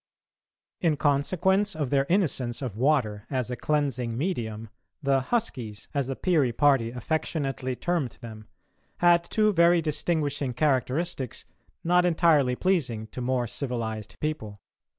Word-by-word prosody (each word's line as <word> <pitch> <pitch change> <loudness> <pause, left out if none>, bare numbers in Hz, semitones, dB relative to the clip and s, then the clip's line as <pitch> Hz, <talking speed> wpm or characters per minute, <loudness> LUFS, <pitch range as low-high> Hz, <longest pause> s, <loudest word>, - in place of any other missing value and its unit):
In 160 -4 +1
consequence 185 +8 +1
of 145 -5 -2
their 140 -1 +2
innocence 140 - 0
of 120 -6 -4
water 115 -5 +1
as 130 -3 -2
a - - -2
cleansing 130 -6 -1
medium, 115 - -3 0.3
the 135 -1 +3
"huskies," 125 - -3
as 140 -3 0
the 135 - -3
Peary 155 -8 +2
party 135 -2 +3
affectionately 135 0 -2
termed 165 -4 -2
them, 110 -3 -10 0.5
had 175 -1 +5
two 215 +4 +2
very 170 0 +5
distinguishing 150 -4 -1
characteristics 135 0 -1 0.4
not 180 +1 +4
entirely 160 -7 +3
pleasing 125 - 0
to 125 - -7
more 125 0 0
civilised 110 -5 -4
people. 110 -10 -4
140 Hz, 130 wpm, -27 LUFS, 120-165 Hz, 0.5 s, had